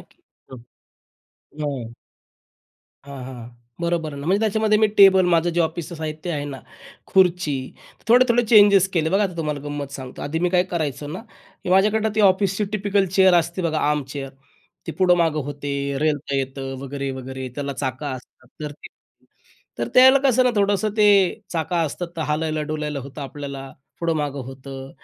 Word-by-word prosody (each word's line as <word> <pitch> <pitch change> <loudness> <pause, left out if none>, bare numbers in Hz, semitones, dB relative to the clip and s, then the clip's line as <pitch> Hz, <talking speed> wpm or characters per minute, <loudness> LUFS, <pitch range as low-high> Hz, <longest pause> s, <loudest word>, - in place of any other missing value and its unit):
की - - -22 1.4
हां. 130 -6 -4 1.1
हां, 140 -2 -8
हां. 120 -3 -9 0.3
बरोबर 170 -3 -1
आहे 140 - -7
ना. 145 - -7
म्हणजे 195 +4 +2
त्याच्यामध्ये 215 0 +2
मी 215 - +5
टेबल 190 -2 +7
माझं 170 +1 +3
जे - - +3
ऑफिसचं 165 +1 -2
साहित्य 160 +2 -5
आहे 145 -2 -3
ना, 135 -2 -6 0.5
खुर्ची, 180 -6 +2 0.5
थोडे-थोडे 245 0 +5
चेंजेस 200 -3 +7
केले. 160 -1 +1
बघा, 195 +2 +3
आता 185 -4 -2
तुम्हाला 150 -3 -3
गंमत 145 -1 -5
सांगतो. 130 -2 -8
आधी 155 +3 -2
मी - - +3
काय 180 -1 +3
करायचो 150 -4 -2
ना 185 - -6 0.4
की - - -5
माझ्याकडं 210 +3 +3
ती 215 - +1
ऑफिसची 195 +1 +3
टिपिकल 205 -1 +1
चेअर 190 -2 +6
असते 170 +2 +1
बघा 160 -2 0
आर्म 150 -1 0
चेअर. 135 -2 -6 0.6
ती - - -4
पुढं 185 -1 +5
मागं 160 -3 +1
होते, 145 0 -5 0.3
रेलता 150 -2 -1
येतं 135 0 -4
वगैरे, 140 0 -4
वगैरे 130 0 -6
त्याला 140 0 -4
चाक 130 +1 -4
असतात 130 -2 -8
तर 150 - -4
ते - - -8 0.9
तर 120 0 -2
त्याला 260 +2 +8
कसं 255 -1 +4
ना, 250 - +4
थोडंसं 205 +1 +1
ते 210 - +4 0.5
चाक 160 -1 -3
असतात 170 +1 -1
तर 160 - -2
हालायला-डूलायला 150 -1 -2
होतं 140 +2 -9
आपल्याला, 140 0 -7 0.3
पुढं-मागं 150 -4 -1
होतं. 135 +1 -9
155 Hz, 165 wpm, -22 LUFS, 140-190 Hz, 1.4 s, त्याला